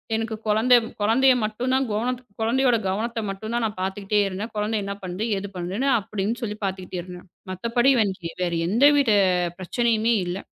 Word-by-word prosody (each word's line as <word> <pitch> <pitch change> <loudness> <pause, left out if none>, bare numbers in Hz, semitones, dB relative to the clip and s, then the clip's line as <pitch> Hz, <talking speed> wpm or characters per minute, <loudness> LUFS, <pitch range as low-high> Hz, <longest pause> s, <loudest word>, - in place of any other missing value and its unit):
எனக்குக் 220 0 -4
குழந்த, 220 +4 +3 0.3
குழந்தய 255 +5 +4
மட்டும் 230 +4 -2
தான், 265 0 +2 0.6
குழந்தயோட 245 +2 +3
கவனத்த 225 +4 -2
மட்டும் 215 +4 -5
தான் 240 - 0
நான் 210 -3 -4
பாத்துக்கிட்டே 200 +2 0
இருந்தேன். 200 +4 -5
கொழந்த 210 +1 -1
என்ன 200 0 -3
பண்ணுது, 185 +4 -3
ஏது 200 +1 -4
பண்ணுனு 190 +10 -2
அப்படின்னு 210 +2 -3
சொல்லிப் 210 -1 -5
பாத்துக்கிட்டே 185 -1 -4
இருந்தேன். 180 +1 -11 0.2
மத்தபடி 235 +7 +2 0.5
வேற 175 -1 -1
எந்த 230 +9 +1 0.2
ஒரு 220 -6 +3 0.4
பிரச்சனையுமே 230 +3 +1
இல்ல. 175 +2 -3
215 Hz, 155 wpm, -24 LUFS, 195-235 Hz, 0.6 s, குழந்தய